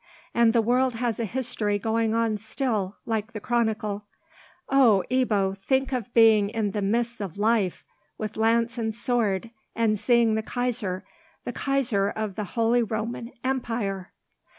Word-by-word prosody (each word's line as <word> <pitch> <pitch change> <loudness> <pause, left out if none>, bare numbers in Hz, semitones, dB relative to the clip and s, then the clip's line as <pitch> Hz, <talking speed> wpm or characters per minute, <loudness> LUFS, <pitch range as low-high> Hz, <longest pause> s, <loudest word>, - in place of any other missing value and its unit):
And 235 -1 +4
the 230 -1 +3
world 250 +2 +2
has 235 -1 -1
a 230 - 0
history 220 -3 -1
going 225 +1 0
on 230 -1 +1
still, 215 -3 -2
like 220 +1 -2
the 215 - -4
Chronicle. 215 -3 -1 0.6
Oh, 240 -8 +5
Ebbo, 210 -7 +1
think 265 +7 0
of 245 -3 -3
being 220 -3 +6
in 215 -2 -1
the 210 - -2
midst 235 +3 0
of 195 -3 -5
life, 210 -3 +1 0.3
with 215 0 -4
lance 230 +1 +1
and 220 -1 -2
sword, 230 -4 0 0.2
and 220 -2 +1
seeing 235 -2 +3
the 220 - +1
Kaiser—the 220 -6 -4
Kaiser 245 -8 +1
of 215 -2 -3
the 210 +1 -4
holy 230 +1 +3
Roman 230 +2 -3
Empire!" 230 -7 -2
225 Hz, 150 wpm, -26 LUFS, 210-240 Hz, 0.6 s, being